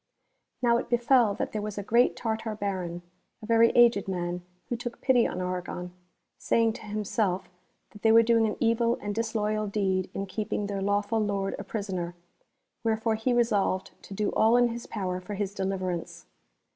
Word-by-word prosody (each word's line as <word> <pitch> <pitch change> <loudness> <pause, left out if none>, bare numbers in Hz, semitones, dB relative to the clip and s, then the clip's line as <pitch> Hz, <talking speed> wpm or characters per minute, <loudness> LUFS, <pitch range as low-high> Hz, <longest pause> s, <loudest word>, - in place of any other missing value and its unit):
Now 235 -1 +4
it 235 - -4
betel 240 -3 +3
that - - -3
there 215 - -3
was 210 -1 -5
a 205 - -3
great 235 +4 +3
Tartar 225 -1 -3
Baron, 185 -4 -3 0.4
a 220 - -10
very 230 +1 +5
aged 235 -5 +5
man, 175 -1 -2 0.3
who 240 - 0
took 235 0 -6
pity 255 -3 +3
on 180 - -4
Argon, 180 -1 -4 0.5
saying 230 -1 +2
to - - -10
himself 205 -3 -1 0.4
that 210 - -14
they 220 - +4
were 230 +1 +7
doing 230 -1 +3
an 210 - -3
evil 230 +1 +2
and 205 0 -4
disloyal 215 -1 -1
deed 190 -2 0
in 195 - -2
keeping 210 +1 -3
their 200 -1 -3
lawful 205 +2 +1
lord 200 -2 -1
a - - -4
prisoner, 190 -4 -4 0.7
wherefore 225 0 +1
he 220 +3 0
resolved 210 -6 +1
to 195 - -9
do 210 +1 0
all 225 +2 +4
in 245 -1 +4
his 235 +1 -6
power 185 -3 -3
for 200 +3 -6
his 200 -1 -3
deliverance. 185 -3 -3
210 Hz, 180 wpm, -28 LUFS, 195-230 Hz, 0.7 s, were